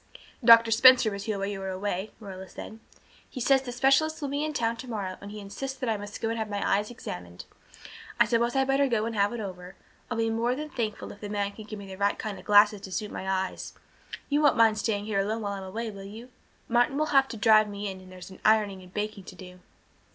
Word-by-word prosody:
"Doctor 230 -1 +8
Spencer 250 0 +7
was 200 0 -6
here 215 -2 -2
while 195 - -2
you 200 -1 -4
were 190 0 -4
away," 190 +1 -3
Marilla 190 -3 -9
said. 220 - -9 0.5
"He 255 - -7
says 270 +2 +4
that - - -15
the - - -3
specialist 275 +6 +2
will 285 -3 -3
be 285 +2 -1
in 310 - -1
town 230 -5 0
tomorrow 215 -6 -5
and 200 - -8
he 210 +1 -8
insists 265 +7 -6
that 255 - -3
I 220 - +1
must 205 0 -8
go 225 - -1
in - - -1
and 230 - -3
have 220 -1 -3
my 205 -1 -2
eyes 205 +1 +1
examined. 90 - -8 0.7
I - - +7
suppose 235 +1 +1
I'd 270 0 +3
better 275 +1 +2
go 225 -4 0
and 230 0 -4
have 200 0 +2
it 240 - -5
over. 185 -2 -7 0.3
I'll 235 - -3
be 225 0 +1
more 235 +2 0
than 300 +2 -6
thankful 220 -4 -4
if 205 - -14
the 205 - -6
man 205 -1 -1
can 215 +1 -11
give 215 0 -7
me 200 - -9
the 190 -1 -9
right 200 0 +1
kind 215 -2 -5
of - - -15
glasses 210 0 +5
to 190 - -9
suit 210 +3 -3
my 190 - -5
eyes. 190 -1 -2 0.5
You 290 +1 +1
won't 290 -2 +4
mind 220 -2 +4
staying 205 -1 -1
here 210 -2 -1
alone 215 +3 -1
while 200 -1 -2
I'm 195 - -6
away, 220 +4 -5
will 195 -1 -10
you? 220 +5 -10 0.4
Martin 240 +3 +2
will 305 0 0
have 270 -1 +5
to 230 - -7
drive 215 0 +5
me 205 0 -5
in 190 -1 -6
and 185 0 -14
there's 185 +1 -11
ironing 210 -3 +3
and 180 0 -15
baking 210 -1 -4
to 185 - -10
do." 180 -1 -12
215 Hz, 260 wpm, -27 LUFS, 200-235 Hz, 0.7 s, Doctor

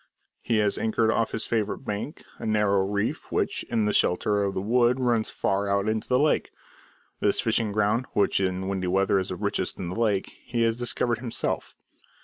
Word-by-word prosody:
He 115 - 0
has 105 -1 +1
anchored 110 0 +2
off 115 -1 +1
his 110 - -3
favourite 110 +3 -2
bank, 105 +10 -4 0.2
a - - -6
narrow 105 -2 +2
reef 100 0 -2
which, - - 0
in 115 -3 +1
the 105 - +1
shelter 100 +3 +2
of 100 -1 -2
the - - 0
wood, 120 +5 +2
runs 120 -3 +1
far 100 +1 -1
out 100 +1 +1
into 110 0 -1
the 125 - +3
lake. 150 +3 +2 0.7
This - - +1
fishing 110 -2 +1
ground, 105 +4 +1
which 100 - +2
in 95 0 -1
windy 95 -2 -2
weather 95 +1 +2
is 95 - -3
the - - -3
richest - - -2
in 90 - -4
the 90 - -5
lake, 105 -4 0
he 120 -2 -1
has 115 0 +2
discovered 120 -1 0
himself. 120 -2 -3
105 Hz, 195 wpm, -26 LUFS, 100-115 Hz, 0.7 s, the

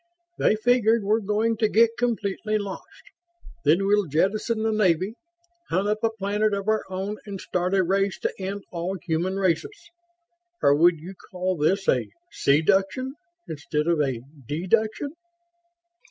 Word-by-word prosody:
"They - - +3
figured 230 -1 +3
we're 215 +3 +2
going 215 +2 0
to 215 -1 +2
get 230 +1 +4
completely 215 -3 -1
lost. 200 -2 -8 0.6
Then 185 +5 +3
we'll 205 -1 +2
jettison 215 - 0
the 225 - +1
Navy, 190 -2 +2 0.6
hunt 190 +4 0
up 210 +1 0
a 225 - +4
planet 210 0 0
of 200 +1 -5
our 220 0 +2
own 190 +3 -4
and 200 -2 -6
start 180 +1 -1
a 190 - +3
race 195 +2 0
to - - -1
end 195 +1 -4
all 180 +2 -3
human 175 +3 -1
races. 265 - -2 0.7
Or 140 - +6
would 170 +3 +4
you 175 +5 -9 0.2
call 185 0 -2
this 190 +6 +1
a - - +2 0.2
see 140 +3 +2
duction 195 +8 +1 0.4
instead 150 -1 -2
of 170 -2 +2
a 130 -5 -1 0.3
dee 160 +5 -3
duction?" 220 +7 +1
195 Hz, 155 wpm, -25 LUFS, 180-215 Hz, 0.7 s, Or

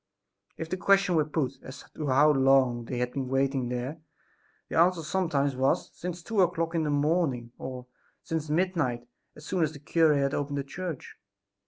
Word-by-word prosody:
If 160 - -4
the 185 - -3
question 195 -1 +3
were 155 -2 +3
put 140 -4 -2
as 130 +1 -10
to 150 - -4
how 140 +3 +5
long 135 -3 +3
they 125 - -4
had 125 0 -1
been 135 -2 -3
waiting 135 -1 0
there 125 +6 -4 0.7
the - - 0
answer 175 -1 +3
sometimes 150 -6 0
was: 130 +1 +1
"since 175 -1 -6
two 220 -1 +1
o'clock 165 -2 +1
in 165 - +1
the 155 - -1
morning," 145 -5 0
or, 130 -1 -6 0.4
"since 160 -3 -3
midnight, 155 -8 0 0.3
as 150 - -13
soon 180 -1 0
as 155 -1 -1
the 145 - -10
cure 160 +1 +3
had 140 0 +1
opened 145 0 -2
the 140 - -1
church." 170 +1 -7
145 Hz, 185 wpm, -28 LUFS, 135-165 Hz, 0.7 s, how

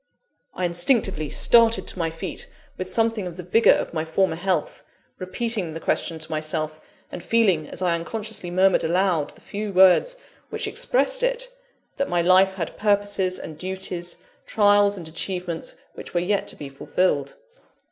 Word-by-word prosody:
I 185 - -1
instinctively 175 - +1
started 230 -1 +4
to - - -3
my 165 -1 0
feet 165 +1 -6 0.3
with 185 0 -5
something 225 -1 +1
of 175 -1 -9
the 180 - -6
vigour 220 +7 +5
of - - -4
my 155 -1 -1
former 160 +1 0
health; 185 +2 -2 0.4
repeating 185 -3 -2
the - - -4
question 165 0 -1
to 155 0 -5
myself; 155 0 -3 0.3
and 175 - -7
feeling, 190 -10 +2
as 185 - -6
I 175 -2 +2
unconsciously 205 +2 -4
murmured 185 +2 +3
aloud 175 -3 +1
the - - -20
few 205 0 -5
words 190 - +5 0.3
which - - -3
expressed - - 0
it, - - -1 0.5
that 275 - -1
my 175 -1 +1
life 190 +2 +4
had 170 -4 -5
purposes 205 -3 +1
and 155 -1 -9
duties, 185 -1 -4 0.3
trials 205 -1 +4
and 170 -3 -7
achievements, 175 0 -4 0.2
which - - -10
were - - +3
yet 195 +3 -1
to - - -3
be 145 - -8
fulfilled. 180 - -1
185 Hz, 165 wpm, -23 LUFS, 170-205 Hz, 0.5 s, vigour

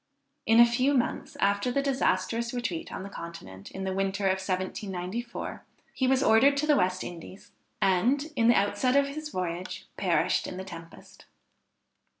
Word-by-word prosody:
In 225 +1 +6
a 235 - +10
few 255 +4 +2
months 245 - -1
after 200 +4 +1
the 275 +2 0
disastrous 235 -3 0
retreat 210 -9 -3
on - - -5
the - - -6
Continent, 135 - -9
in 190 - -6
the 190 0 -2
winter 195 +1 -1
1794, 190 +3 -3 0.3
he 260 - 0
was 265 0 +3
ordered 270 +6 +5
to 295 - +1
the 300 -1 +4
West 185 -5 +1
Indies, 175 +2 -10 0.3
and, 250 - +2
in 230 - +3
the 240 - +6
outset 205 +6 +2
of 280 0 +3
his 305 +2 -6
voyage, 180 - -4
perished - - +1
in 180 - -6
the 190 - -5
tempest. 165 -3 -12
205 Hz, 160 wpm, -28 LUFS, 185-255 Hz, 0.3 s, a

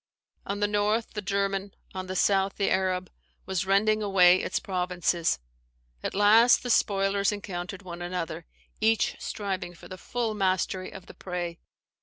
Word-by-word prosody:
On 200 +1 -3
the 205 - +3
north 210 +2 0
the 210 - -3
German, 195 0 -1 0.2
on 185 0 -5
the 185 - -4
south 195 +1 +2
the 200 - +1
Arab, 185 -1 0 0.3
was 190 -1 -2
rending 215 +2 +3
away 185 -3 +6
its - - -2
provinces. 180 - 0 0.6
At - - -4
last 220 +4 +6
the 245 - -1
spoilers 200 -1 +2
encountered 195 -2 -6
one 175 -1 -8
another, 175 - -4 0.3
each 225 0 +2
striving 190 -4 -4
for - - -13
the 185 - -9
full 235 0 -2
mastery 185 -2 0
of 190 -2 -10
the - - -12
prey. 175 -2 -5
195 Hz, 155 wpm, -27 LUFS, 180-205 Hz, 0.6 s, away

